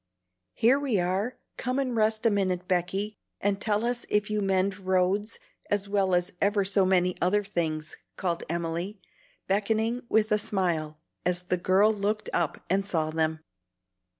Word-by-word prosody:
"Here 250 +5 +4
we 265 -8 0
are! 190 +7 -1 0.2
Come 255 +1 -2
and 260 -3 0
rest 220 +1 +1
a 230 - +5
minute, 185 -3 0
Becky, 190 +4 0 0.3
and 200 0 0
tell 215 0 0
us 240 0 -1
if 210 0 +1
you 210 -1 0
mend 195 0 +1
roads 190 +3 +1 0.3
as 205 -1 0
well 195 -2 +2
as 180 +3 0
ever 200 0 +2
so 195 -1 +3
many 180 -1 +3
other 205 +4 +2
things;" 160 -6 -2 0.2
called 170 -3 -1
Emily, 170 +4 -3 0.5
beckoning 220 +4 0
with 215 0 +2
a 210 - +4
smile, 170 -7 -1 0.3
as 180 0 +1
the 180 0 0
girl 190 +5 +4
looked 210 +1 -2
up 170 -4 -1
and 195 +2 +1
saw 160 -5 -1
them. 160 0 0
195 Hz, 160 wpm, -27 LUFS, 180-210 Hz, 0.5 s, a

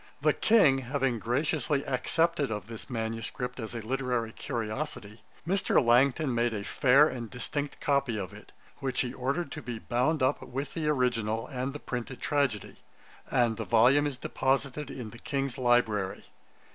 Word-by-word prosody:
The - - +3
King 165 -12 +5
having 130 -2 -1
graciously 140 +4 0
accepted 160 +3 +1
of 105 -2 -4
this 115 +3 -9
manuscript 115 +2 -3
as 110 0 -5
a 115 - -4
literary 125 -2 -1
curiosity, 115 -1 -5 0.3
Mr. 195 +2 +3
Langton 130 +3 +3
made 120 -1 +1
a 100 - -3
fair 135 +6 +5
and 120 -5 -5
distinct 140 +3 -4
copy 140 -5 +1
of 95 -4 -5
it, - - -13 0.3
which 135 -2 -1
he 125 -1 -3
ordered 140 +4 -2
to - - -6
be 120 0 -5
bound 130 +7 0
up 130 +3 +2
with 135 +2 -5
the 160 -2 -2
original 115 -6 +1
and 130 -1 -3
the 145 - -6
printed 125 -1 -5
tragedy; 140 -8 -1 0.5
and 120 -3 +2
the 115 - -2
volume 125 +6 +4
is 140 -3 -4
deposited 135 +2 -1
in 125 -5 -7
the 120 - -12
King's 135 -2 -2
library. 110 -6 +1
125 Hz, 160 wpm, -29 LUFS, 115-140 Hz, 0.5 s, King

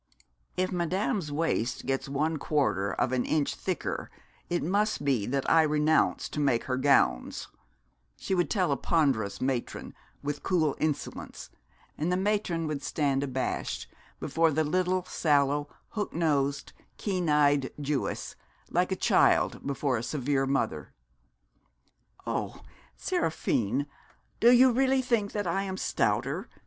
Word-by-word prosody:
'If 185 0 0
Madame's 180 -1 -1
waist 145 -6 -1
gets 135 0 -2
one 155 +3 0
quarter 135 -10 0
of 125 - 0
an 130 -1 +1
inch 155 -2 0
thicker - - -3 0.4
it 175 - 0
must 200 0 0
be 125 -8 +1
that 135 +1 -1
I 165 - +6
renounce 150 0 +2
to - - -5
make 135 -5 +2
her 130 - -1
gowns,' 135 - +2 0.7
she - - -3
would 175 -2 +1
tell 185 -8 +1
a 140 - +1
ponderous 130 - +1
matron, 130 -2 -3 0.3
with 145 0 -3
cool 160 -6 +1
insolence, 155 -2 -4 0.5
and 160 +4 0
the 180 - +2
matron 190 -4 0
would 150 -2 -3
stand 140 -1 0
abashed 130 -2 -3 0.3
before 165 +4 +2
the 160 +1 +1
little 185 +3 +1
sallow, 145 -3 +1 0.2
hooked 210 -6 -4
nosed, 140 -4 0 0.2
keen 185 -5 -1
eyed 145 -2 +3
Jewess, 145 -1 -2 0.4
like - - +1
a - - +1
child - - +2
before 140 -2 0
a - - -3
severe 135 +2 0
mother. 135 0 -1 1.3
'Oh, - - -3 0.4
Seraphine, 115 +6 0 0.5
do 235 - +6
you 250 +1 +7
really 265 +1 +2
think 230 -5 0
that 205 -2 -2
I 180 +3 0
am 190 -1 -4
stouter?' - - -1
150 Hz, 135 wpm, -28 LUFS, 140-180 Hz, 1.3 s, you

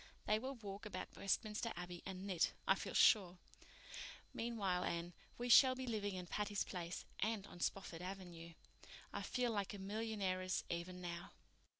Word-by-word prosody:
They 215 0 +3
will 265 +3 -3
walk 205 -2 -6
about - - -5
Westminster 215 +3 0
Abbey 175 -1 -5
and 190 0 -5
knit, 185 -4 +2
I - - +8
feel - - -4
sure. 185 -5 +6 1.0
Meanwhile, 205 -6 0
Anne, 170 +1 -1 0.2
we 245 - -2
shall 255 +2 +9
be 260 0 -3
living 205 -5 -1
in 180 -1 -4
Patty's 205 +2 0
Place—and 190 +4 -3
on 175 - -11
Spofford 175 -2 -1
Avenue. 175 -3 -6 0.6
I - - -2
feel 250 -2 +1
like 205 -1 -1
a - - -5
millionairess 195 -2 -1
even 175 +2 -3
now." 170 -1 -5
195 Hz, 155 wpm, -40 LUFS, 180-220 Hz, 1.0 s, shall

